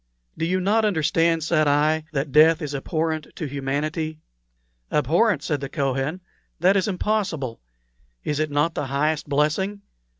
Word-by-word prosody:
"Do 165 - -2
you 185 +2 +1
not 210 +4 +2
understand," 165 -3 +2
said 155 -2 +2
I, 155 +2 +2
"that 140 -1 -2
death 155 +2 +6
is 145 -1 -4
abhorrent 155 +2 -2
to 160 - -4
humanity?" 150 +3 -3 0.7
"Abhorrent!" 160 - +2
said 145 -3 -1
the 140 - -4
Kohen; 140 +4 -1 0.4
"that 185 +4 +4
is 195 0 +2
impossible. 180 - -2 0.6
Is 150 0 -2
it 155 0 0
not 145 +3 +1
the 145 - -3
highest 150 +2 -1
blessing? 160 +8 0
155 Hz, 145 wpm, -23 LUFS, 145-170 Hz, 0.7 s, death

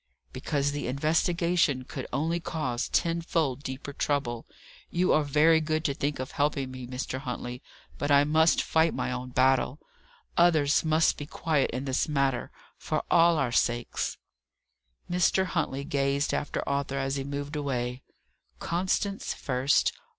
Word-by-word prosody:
"Because 140 +2 -1
the 145 -2 -3
investigation 160 +1 +1
could 130 +1 -7
only 160 +6 0
cause 135 -7 -3
tenfold 165 -5 0
deeper 140 +1 -6
trouble. 135 -5 -2 0.4
You 180 +2 +2
are 155 - +4
very 155 +3 +4
good 155 0 -1
to 140 - +1
think 145 +2 -2
of 130 0 -5
helping 145 -2 0
me, 130 -1 -7
Mr. 130 +1 -4
Huntley, 125 -1 -5 0.4
but 145 - -1
I 140 0 +6
must 160 +2 +3
fight 160 0 +2
my 125 0 -2
own 125 0 -4
battle. 130 +1 +2 0.6
Others 155 -5 +4
must 160 0 +3
be 145 - -6
quiet 150 -3 0
in 130 +3 -4
this 135 +4 0
matter 135 -4 0 0.3
for - - -2
all 170 0 +5
our 135 -5 0
sakes." 120 -1 0 0.9
Mr. 180 +1 +2
Huntley 150 -6 -2
gazed 140 0 0
after 145 - -2
Arthur 140 -1 -1
as 135 0 -1
he 135 - -2
moved 140 +2 -5
away. 125 -3 -2 0.6
Constance 190 +3 -1
first! 130 +1 +1
140 Hz, 145 wpm, -28 LUFS, 130-160 Hz, 0.9 s, I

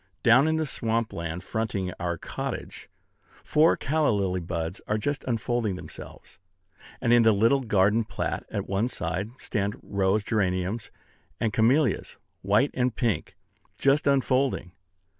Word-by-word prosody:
Down 125 +6 +6
in 160 - +2
the 160 0 0
swamp 115 -4 -1
land 85 +1 -4
fronting 100 -4 -2
our 85 -1 -2
cottage, - - -6 0.5
four 155 +2 +4
calla 155 +1 +1
lily 95 -4 0
buds 85 0 -4
are 105 - +1
just 140 +6 -2
unfolding 120 -3 -1
themselves; 90 -4 -11 0.6
and 120 -2 +2
in 120 - +7
the 110 -1 +6
little 115 +7 +3
garden 105 -1 +3
plat - - -3
at - - -3
one 100 +4 0
side 90 -2 -3
stand 100 -4 -2
rose 100 +1 +1
geraniums 100 0 -1 0.5
and 110 -2 0
camellias, 130 +7 +2 0.2
white 105 +8 +2
and 125 -1 0
pink, 115 -5 -1 0.4
just 140 +2 +2
unfolding. 135 -7 +1
110 Hz, 140 wpm, -26 LUFS, 95-125 Hz, 0.6 s, in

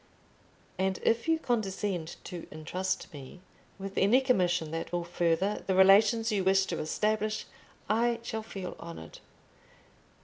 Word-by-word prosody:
And 190 0 0
if 230 +6 +1
you 325 0 +3
condescend 200 - -2
to 175 -2 -7
intrust 185 +4 -3
me 140 +4 -10 0.4
with 195 0 -4
any 210 +7 +5
commission 180 - +1
that 165 0 -4
will 175 -1 -1
further 175 +3 0
the 190 - +1
relations 210 +4 +5
you 200 -3 +1
wish 190 +1 +4
to 170 - -3
establish, 215 +6 -1 0.4
I 235 +2 +2
shall 220 -1 -3
feel 195 -4 -7
honoured. 165 - -9
190 Hz, 135 wpm, -30 LUFS, 175-215 Hz, 0.4 s, any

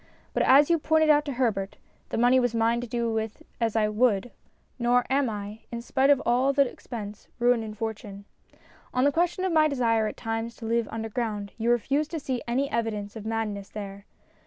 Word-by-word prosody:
But - - +1
as 285 +5 +6
you 335 - +3
pointed 315 0 +3
out 295 0 +3
to 285 - -3
Herbert, 215 -6 -1 0.3
the - - -3
money 245 +2 +5
was 245 -2 0
mine 230 +1 +2
to 245 - -5
do 235 -1 -1
with 220 -1 -3 0.2
as 230 -2 0
I 215 -1 +3
would, 215 0 +1 0.5
nor 245 +1 +3
am 275 -2 +2
I, 205 0 -6
in 235 0 -5
spite 270 +2 +2
of 285 -2 +6
all 255 +3 +3
the 280 -1 +4
expense, 210 -4 -8
ruined 240 -1 +3
in 215 -1 -7
fortune. 210 -2 -6 0.7
On 255 - +3
the 285 - +4
question 350 +4 0
of 375 - 0
my 310 -1 +5
desire 230 -6 +1
at - - -6
times 225 0 -3
to 230 - -9
live 230 0 0
underground 220 -2 -3
you 230 +1 -1
refused 275 +6 +1
to 325 - -4
see 260 -4 -3
any 260 +4 0
evidence 215 -3 -2
of 220 -1 -7
madness 215 -3 -3
there. 200 -1 -8
235 Hz, 205 wpm, -26 LUFS, 220-265 Hz, 0.7 s, as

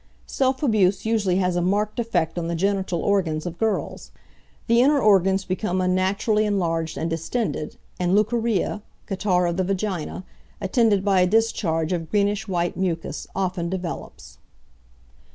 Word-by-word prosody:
Self 265 +1 0
abuse 205 -7 +2
usually 215 -5 +1
has 180 -1 +1
a 175 - +1
marked 205 +5 0
effect 175 -8 -1
on 165 - -3
the 170 - -2
genital 190 -1 -1
organs 175 -6 0
of 170 -1 -6
girls. 220 -1 -2 0.6
The 235 0 +4
inner 285 +3 +4
organs 195 -4 +3
become 185 0 -1
unnaturally 190 +4 +1
enlarged 165 -5 -1
and 165 - -2
distended, 165 +1 -3 0.2
and 180 +1 +2
leucorrhea, 215 -1 +1 0.2
catarrh 190 -3 +1
of 170 0 -1
the 190 - +1
vagina, 190 -2 -3 0.4
attended 205 -1 +2
by 195 -2 +4
a 180 - +4
discharge 185 -6 +1
of 165 -2 -3
greenish 205 +1 0
white 175 -2 -1
mucus, 175 -3 -3
often 180 -2 -1
develops. 180 -2 -6
190 Hz, 145 wpm, -23 LUFS, 175-210 Hz, 0.6 s, The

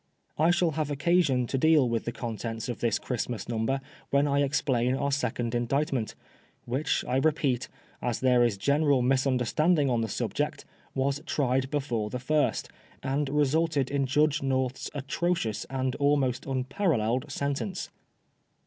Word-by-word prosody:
I 160 +2 +4
shall 175 -1 +3
have 155 -1 -2
occasion 145 -3 +2
to 135 +2 -2
deal 155 -3 +5
with 115 -1 -1
the 120 - -2
contents 115 -1 -5
of 120 - -4
this 115 -2 +1
Christmas 120 -3 -4
Number 120 +4 -1 0.3
when 140 +1 +3
I 140 0 +2
explain 130 -3 +1
our 140 +1 -1
second 125 -3 -1
Indict 135 +5 0
ment; 115 -5 -2 0.5
which, 135 +5 -1
I 125 - +1
repeat, 135 -4 +1 0.3
as 120 -3 -1
there 125 -2 +4
is 115 -4 +1
general 140 +3 +2
misunder 130 -1 +2
standing 155 +1 +2
on 120 -2 +1
the 115 - -2
subject, - - -2 0.3
was 135 +2 0
tried 130 -2 +1
before 125 -7 -1
the 125 - -3
first, 150 +4 0 0.4
and 140 +1 0
resulted 150 -1 +1
in 140 -1 +1
Judge 150 +2 +2
North's 130 -1 -1
atrocious 145 -5 -1
and 130 -1 -2
almost 140 -4 +1
un 130 -1 -1
paralleled 130 - 0
sentence. 140 +8 -3
135 Hz, 155 wpm, -28 LUFS, 125-145 Hz, 0.5 s, deal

